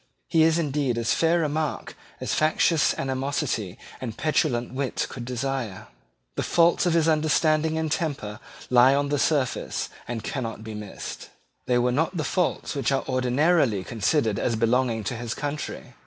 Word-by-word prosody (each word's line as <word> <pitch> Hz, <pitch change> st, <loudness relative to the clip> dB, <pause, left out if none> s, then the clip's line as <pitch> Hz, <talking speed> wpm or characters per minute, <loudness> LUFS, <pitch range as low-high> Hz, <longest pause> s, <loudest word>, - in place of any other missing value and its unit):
He 165 Hz, -, +3 dB
is 160 Hz, +1 st, +4 dB
indeed 145 Hz, -6 st, 0 dB
as 115 Hz, -1 st, +1 dB
fair 165 Hz, +1 st, +2 dB
a -, -, +1 dB
mark 155 Hz, 0 st, -3 dB, 0.2 s
as -, -, -2 dB
factious 155 Hz, 0 st, +2 dB
animosity 130 Hz, -, -2 dB, 0.2 s
and 115 Hz, -4 st, -5 dB
petulant 130 Hz, -6 st, 0 dB
wit 135 Hz, 0 st, -1 dB
could 120 Hz, -2 st, -6 dB
desire. 125 Hz, -5 st, -3 dB, 0.4 s
The -, -, -2 dB
faults 170 Hz, +1 st, +3 dB
of 170 Hz, -, +2 dB
his 165 Hz, -1 st, +3 dB
understanding 155 Hz, 0 st, +2 dB
and 160 Hz, -1 st, -1 dB
temper 140 Hz, -, -2 dB, 0.3 s
lie 125 Hz, +2 st, +6 dB
on 140 Hz, 0 st, 0 dB
the 145 Hz, -1 st, 0 dB
surface, 140 Hz, -5 st, 0 dB, 0.2 s
and 115 Hz, -2 st, -4 dB
cannot 115 Hz, -5 st, -4 dB
be 110 Hz, -1 st, -7 dB
missed. 105 Hz, -2 st, -7 dB, 0.4 s
They 125 Hz, -, +3 dB
were 125 Hz, +1 st, +2 dB
not 160 Hz, +7 st, 0 dB
the 155 Hz, -, 0 dB
faults 180 Hz, +3 st, -1 dB
which 140 Hz, -1 st, 0 dB
are 135 Hz, -, +1 dB
ordinarily 130 Hz, -, +2 dB
considered 110 Hz, +1 st, 0 dB
as 120 Hz, -, 0 dB
belonging 115 Hz, 0 st, +1 dB
to 125 Hz, -, -3 dB
his 120 Hz, 0 st, -4 dB
country. 145 Hz, +1 st, -5 dB
135 Hz, 165 wpm, -25 LUFS, 120-155 Hz, 0.4 s, lie